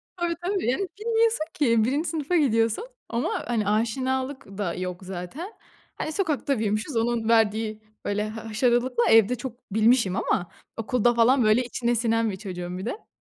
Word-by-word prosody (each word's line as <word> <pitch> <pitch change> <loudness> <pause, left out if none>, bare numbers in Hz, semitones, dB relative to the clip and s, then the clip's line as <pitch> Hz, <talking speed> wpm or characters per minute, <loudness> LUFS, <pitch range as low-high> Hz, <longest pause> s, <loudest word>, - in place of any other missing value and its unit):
Tabii, 345 -1 -1
tabii. 390 0 0
Yani, 365 +10 0
bilmiyorsun 450 -5 +2
ki 230 -6 +3
1'inci 285 +8 0
sınıfa 320 +2 -1
gidiyorsun. 230 - +2 0.2
Ama 235 +1 -1
hani, 225 -4 0
aşinalık 260 +5 -1
da 185 -5 -1
yok 180 0 -5
zaten. 190 - -6 0.4
Hani, - - -3
sokakta 300 - 0
büyümüşüz; 215 +5 -1
onun 230 0 0
verdiği 220 -1 +2 0.2
böyle 210 +1 -1
ha 225 +1 -8
haşarılıkla; 240 +2 +2
evde 225 +2 +6
çok 245 -3 -9
bilmişim 220 -3 +3
ama, 175 -2 -1 0.3
okulda 240 +1 +2
falan 240 +2 +4
böyle 215 +4 +4
içine 240 0 -1
sinen 230 -1 +1
bir - - -4
çocuğum 180 -3 -6
bir 190 - -5
de. 410 - -5
235 Hz, 160 wpm, -25 LUFS, 215-270 Hz, 0.4 s, evde